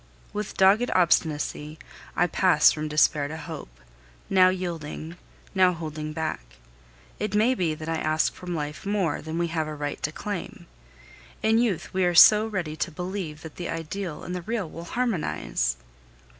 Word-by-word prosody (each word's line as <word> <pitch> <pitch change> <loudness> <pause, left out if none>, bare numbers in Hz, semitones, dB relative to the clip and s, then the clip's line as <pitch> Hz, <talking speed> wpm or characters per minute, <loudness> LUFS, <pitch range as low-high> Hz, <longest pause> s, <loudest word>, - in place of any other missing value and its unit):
With 210 -1 -4
dogged 200 +6 +5
obstinacy, 155 -3 +1 0.4
I - - +3
pass - - +5
from 155 0 -3
despair 150 -1 +3
to 160 +2 -6
hope, 150 - -9 0.5
now 185 -1 +6
yielding, 170 -3 -4 0.4
now 185 -2 +4
holding 155 -2 -5
back. 160 - -3 0.8
It 210 -1 -2
may 225 +5 +4
be 170 -10 0
that 155 +1 -8
I 165 0 -1
ask 155 0 +1
from 180 -1 -6
life 150 -1 -4
more 195 -6 0
than 160 +2 -5
we 170 0 0
have 160 -1 -1
a 155 - -5
right 145 -1 -4
to 150 - -1
claim. 200 +2 -6 0.8
In 220 +1 +4
youth 220 -8 -1
we 190 0 +1
are 175 -1 +2
so 215 +5 +8
ready 180 -8 -3
to 150 - -1
believe 180 -2 -5
that 160 - -10
the 175 - -4
ideal 165 +1 -4
and 180 - -5
the 180 - -3
real 215 0 -2
will 165 +2 -9
harmonize! 170 - -1
170 Hz, 170 wpm, -26 LUFS, 155-190 Hz, 0.8 s, so